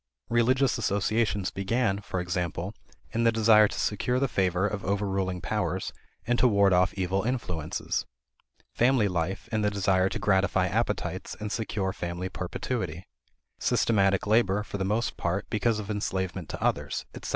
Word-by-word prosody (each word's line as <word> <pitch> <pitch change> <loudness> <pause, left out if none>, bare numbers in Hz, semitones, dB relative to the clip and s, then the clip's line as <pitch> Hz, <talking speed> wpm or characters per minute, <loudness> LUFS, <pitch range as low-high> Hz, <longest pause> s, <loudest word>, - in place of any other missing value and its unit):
Religious 125 +2 +3
associations 105 -1 0
began, 100 +1 0
for 95 - -4
example, 90 +1 -2 0.4
in 115 - 0
the 115 - +5
desire 110 -1 +6
to - - -7
secure 125 +4 0
the 135 - +2
favor 95 -4 +1
of 105 -1 -2
overruling 95 -2 -1
powers - - -2 0.3
and 120 +1 +1
to 125 - +5
ward 100 -4 +4
off 90 +1 +4
evil 95 0 0
influences; 90 - -2 0.7
family 120 -3 +3
life 90 0 -2
in 110 -1 +1
the 105 - +2
desire 95 -2 +2
to - - -3
gratify 95 -3 +2
appetites 90 - -2
and 105 -1 -4
secure 105 -4 -2
family 85 0 -4
perpetuity; 90 -2 -4 0.5
systematic 100 -4 +2
labor, 105 -2 +3
for 100 - -6
the - - 0
most 110 +5 -1
part, 85 +4 -1
because 110 +1 +1
of 105 0 -4
enslavement 95 -4 -3
to - - -5
others, - - -1
etc. - - -7
100 Hz, 155 wpm, -28 LUFS, 95-110 Hz, 0.7 s, desire